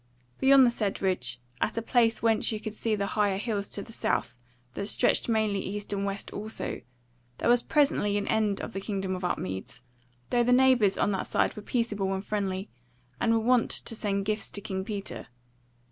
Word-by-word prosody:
Beyond 270 -1 +7
the 240 - +4
said 210 -4 -1
ridge, 125 -11 -1 0.2
at - - 0
a - - +1
place 230 -2 +2
whence 225 -1 +3
you 215 - -3
could 215 0 -6
see 220 0 -1
the 200 -1 -1
higher 200 -1 +1
hills 205 -2 -2
to 200 - -2
the 225 - -12
south, - - -1 0.4
that 200 - -3
stretched 240 - +2
mainly 215 -3 +1
east 205 +2 -4
and 200 0 -1
west 195 0 -4
also, 215 +2 -5 0.6
there - - 0
was 240 0 +5
presently 275 -10 +2
an 205 - -2
end 215 -2 +1
of 230 - -6
the 195 - -4
Kingdom 195 -2 -2
of 180 - -7
Upmeads, 95 - -4 0.5
though 240 -1 +3
the 245 - +2
neighbours 250 -6 +4
on 205 - +2
that 190 - -2
side - - +1
were 210 - -7
peaceable 205 -4 -1
and 190 +1 -5
friendly, 195 -2 -2 0.5
and 230 - +2
were 225 - +3
wont 245 0 +3
to 225 - -1
send 200 -2 -1
gifts 215 +1 -1
to 205 - -4
King 190 -2 -3
Peter. 195 - -6
210 Hz, 200 wpm, -28 LUFS, 195-230 Hz, 0.6 s, Beyond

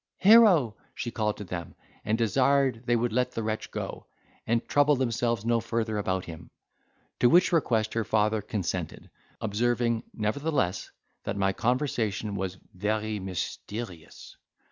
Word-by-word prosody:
Here 195 - +6 0.2
she 120 - -4
called 105 -2 -1
to 105 - -6
them, 90 -3 -6 0.3
and 110 +2 0
desired 130 +1 +2
they 120 - +3
would 120 -1 0
let 125 +1 +1
the 115 - -3
wretch 110 0 -3
go, - - -6 0.4
and 115 +1 0
trouble 145 0 +4
themselves 115 -3 -1
no 115 0 +2
further 115 -1 -2
about 95 -3 -1
him. 80 0 -10 0.7
To 120 - +5
which 175 +6 +5
request 115 -10 +1
her 115 - 0
father 110 +1 +1
consented, 100 -5 -4 0.3
observing, 115 +2 0
nevertheless, 110 - -1 0.4
that 100 - -3
my 95 0 +1
conversation 115 -4 -1
was 95 -1 -3 0.2
'very 105 +2 -1
mysterious. 95 0 -6
110 Hz, 140 wpm, -28 LUFS, 105-120 Hz, 0.7 s, Here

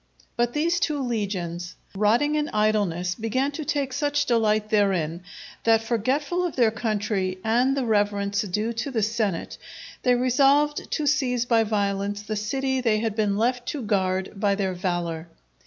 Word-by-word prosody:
But 240 0 0
these 335 +3 +1
two 300 -4 0
legions, 185 -7 -3 0.2
rotting 225 +9 +2
in 300 -1 0
idleness 205 -5 +1
began 255 +6 -1
to 310 +2 -5
take 285 -4 -1
such 290 +1 0
delight 215 -3 +1
therein, 185 -6 +1 0.4
that 225 -1 +4
forgetful 270 - 0
of 350 - -2
their 235 -4 +3
country 210 -4 -1
and 245 +5 +2
the 265 - 0
reverence 205 -2 +1
due 210 +3 -2
to 230 +5 -3
the 230 -5 -1
senate, 215 -5 -2 0.4
they 250 -1 +3
resolved 275 +4 +2
to 300 - -1
seize 255 -4 +1
by 230 -2 +3
violence 205 -1 -1
the 215 0 -4
city 265 +5 -1
they 225 -3 +2
had 220 -1 -2
been 210 -2 +1
left 245 +2 0
to 285 -4 -3
guard 190 -3 0
by 200 0 +2
their 195 -2 -1
valour. 175 -3 -3
220 Hz, 160 wpm, -25 LUFS, 200-260 Hz, 0.4 s, that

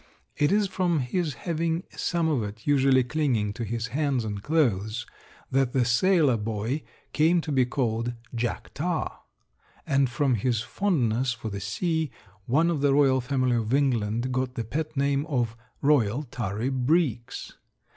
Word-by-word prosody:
It 145 +1 +2
is 205 +1 +3
from 180 -3 0
his 150 +3 -1
having 165 0 -1
some 170 -2 0
of 145 -6 +1
it 105 +1 -7
usually 135 -2 +4
clinging 125 -7 0
to 120 - -5
his 115 +1 -3
hands 135 -2 0
and 105 -2 -4
clothes 120 -6 0 0.5
that 135 -2 +2
the 130 -3 +3
sailor 145 +1 +3
boy 110 +6 -2 0.3
came 165 +3 +4
to 155 - -5
be 130 -3 +3
called 120 -2 -1 0.2
"Jack 115 -6 -3
Tar," 170 +1 -2 0.7
and 140 -2 +2
from 135 +1 +1
his 115 0 0
fondness 125 - 0
for 115 -1 -6
the 100 0 -5
sea 160 - -1 0.4
one 160 +7 +3
of 155 -4 -1
the 140 -1 +3
royal 135 -2 +4
family 130 -1 +1
of 115 +3 0
England 120 -3 +1
got 130 0 -1
the 115 - -2
pet 155 +6 -4
name 140 0 +2
of 120 -7 -1 0.3
"Royal 135 -3 +3
Tarry 115 -2 -3
Breeks." 130 -2 0
130 Hz, 155 wpm, -26 LUFS, 115-150 Hz, 0.7 s, usually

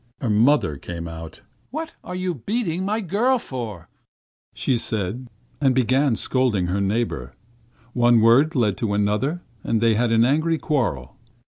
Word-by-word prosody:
Her 120 - -1
mother 110 - +3
came 85 +3 -6
out. 80 +1 -9 0.3
'What 320 +4 -5
are 180 - -6
you 185 -1 -2
beating 185 - -2
my 215 +3 -1
girl 220 +8 +1
for?' 115 - -6 0.7
said 125 -3 0
she; 110 +3 -3 0.4
and 130 -2 +4
began 130 +1 +2
scolding 120 -7 0
her 95 +3 -1
neighbour. 95 - -2 0.6
One 120 -1 +4
word 130 +9 +4
led 105 -6 +1
to 105 -3 -1
another 105 +12 0 0.2
and 115 - 0
they 115 0 +3
had 115 +2 +1
an 115 0 +4
angry 155 +5 +2
quarrel. 105 - -2
120 Hz, 150 wpm, -23 LUFS, 105-155 Hz, 0.7 s, and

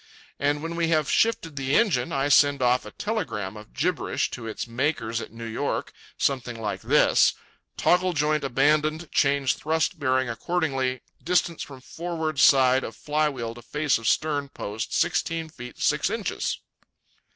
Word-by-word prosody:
And 145 +1 0
when 165 +1 -4
we 170 -1 +1
have 155 -3 +1
shifted 195 -9 +1
the 135 +1 0
engine, 150 - +2
I 135 +1 0
send 145 -1 +4
off 125 +1 +2
a - - -9
telegram 115 - -3
of 105 0 -12
gibberish 175 +2 -1
to 120 -3 -6
its 110 - -4
makers 115 -2 -1
at - - -8
New 115 +1 -8
York, 115 - -3 0.2
something 125 -4 -1
like 105 -2 -3
this: - - +4 0.4
_Toggle 180 0 +2
joint 150 0 +1
abandoned 150 +4 +1
change 140 -1 +2
thrust 160 +1 -1
bearing 130 -2 +1
accordingly 135 -1 -1 0.2
distance 175 -1 +1
from 135 -2 -8
forward 160 -1 -4
side 130 -1 +5
of - - -6
flywheel 150 -6 -1
to 120 - -12
face 150 +2 0
of 115 - -4
stern 145 -3 +1
post 105 -3 -5
sixteen 165 -2 0
feet 125 -5 -10
six - - +2
inches_. - - -2
140 Hz, 155 wpm, -25 LUFS, 125-160 Hz, 0.4 s, side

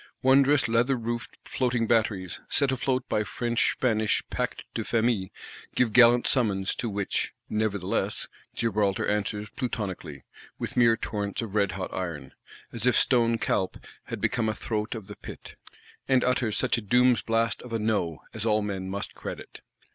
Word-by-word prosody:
Wondrous 135 +1 +5
leather 120 +4 +2
roofed 120 0 -4
Floating 120 -3 0
batteries, 105 -6 0
set 140 -2 +2
afloat 130 0 -1
by 105 - +1
French 120 +3 0
Spanish 110 -4 +1
Pacte - - -2
de - - -2
Famille, 110 -5 +1 0.5
give 115 -4 +2
gallant 120 0 +7
summons: 100 -7 +1
to 115 - -3
which, 100 -1 -2 0.2
nevertheless, 100 -3 -1 0.3
Gibraltar 105 -4 +1
answers 105 0 -1
Plutonically, 95 - -4 0.3
with - - -5
mere 115 -2 +5
torrents 100 +1 -3
of 105 -4 -7
redhot 95 -3 0
iron,—as 90 - -5
if 125 - +4
stone 115 -2 +3
Calpe 95 -4 -1 0.3
had - - -5
become 110 -2 +1
a 110 - -2
throat 110 +1 -3
of 110 -3 -7
the 105 +1 -10
Pit; - - -10 0.5
and 130 -1 +4
utters 125 -4 +1
such 125 -2 +2
a - - -7
Doom's 125 +2 +4
blast 115 -1 0
of 125 - -11
a 115 - 0
No, 105 -7 -1
as 110 -2 -4
all 105 -2 +2
men 95 -2 -3
must 100 +1 -4
credit. - - -8
110 Hz, 155 wpm, -27 LUFS, 100-120 Hz, 0.5 s, gallant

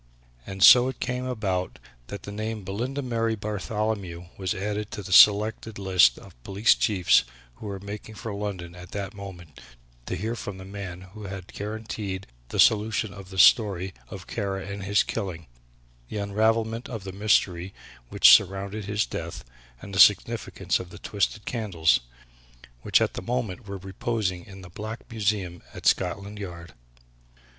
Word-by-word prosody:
And 95 -1 -2
so 125 +5 +9
it 130 -2 -5
came 125 0 -2
about 100 -7 -2 0.3
that 100 -3 -7
the 100 - -7
name 110 +2 -3
of 100 - -11
Belinda 125 +9 -3
Mary 115 -2 0
Bartholomew 105 -4 -3
was 95 -1 -2
added 105 +2 -3
to 105 - -6
the 95 0 -3
selected 105 +2 +6
list 90 -10 +4
of - - -15
police 100 +3 +4
chiefs, 95 -5 +3 0.3
who - - -8
were 100 -1 -5
making 105 +2 -8
for 105 +2 -6
London 95 -4 -5
at 90 -1 -12
that 100 0 -4
moment 95 -5 -10 0.5
to - - -2
hear 110 +7 -3
from 100 -4 -6
the 95 - -10
man 95 -2 -7
who 100 +3 -11
had 95 -1 -8
guaranteed 105 -2 -5 0.2
the - - -4
solution 110 -1 +3
of 95 -1 -11
the 95 - -9
story 95 -4 +5 0.2
of - - -8
Kara 95 -2 -3
and 100 +1 -6
his 100 0 +3
killing; 95 -7 -4 0.6
the - - -5
unravelment 110 +3 0
of 110 -5 -6
the 95 - -6
mystery 95 -3 +1 0.4
which 60 - +8
surrounded 100 +6 +2
his 105 +1 0
death, - - -6 0.4
and 100 - -9
the 95 - -1
significance 100 -2 +4
of 90 - -8
the 105 - -11
twisted 105 +1 -2
candles, 95 -9 +1 0.8
which - - +3
at - - +1
that - - -5
moment 120 -3 -3
were 100 0 -5
reposing 95 -1 -3
in 95 -1 -11
the 90 - -11
Black 110 +5 -6
Museum 100 -5 -1
at - - -9
Scotland 100 +3 0
Yard. 85 -4 -8
100 Hz, 165 wpm, -26 LUFS, 95-110 Hz, 0.8 s, so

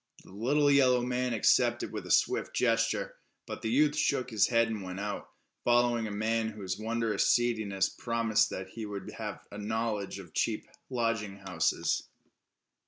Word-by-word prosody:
The - - -16
little 145 +8 +2
yellow 130 -3 +4
man 125 0 -1
accepted 115 - +2
with - - -6
a - - -3
swift - - +2
gesture, 115 -2 +1 0.3
but - - -7
the 110 - -2
youth 145 +5 +3
shook 135 -4 0
his 110 -2 +3
head 115 -1 +3
and 110 -2 -4
went 90 0 -6
out, 105 0 -4 0.3
following 120 -1 +3
a - - -5
man 110 +2 0
whose 100 -3 -5
wondrous 115 0 0
seediness 110 -6 +2
promised 115 -2 +1
that 95 0 -6
he 110 +2 -6
would 100 -2 -6
have - - -6
a 100 - -7
knowledge 105 -2 -2
of 90 -5 -11
cheap - - -1 0.2
lodging 115 -5 -1
houses. 90 -4 -1
115 Hz, 165 wpm, -30 LUFS, 105-120 Hz, 0.3 s, yellow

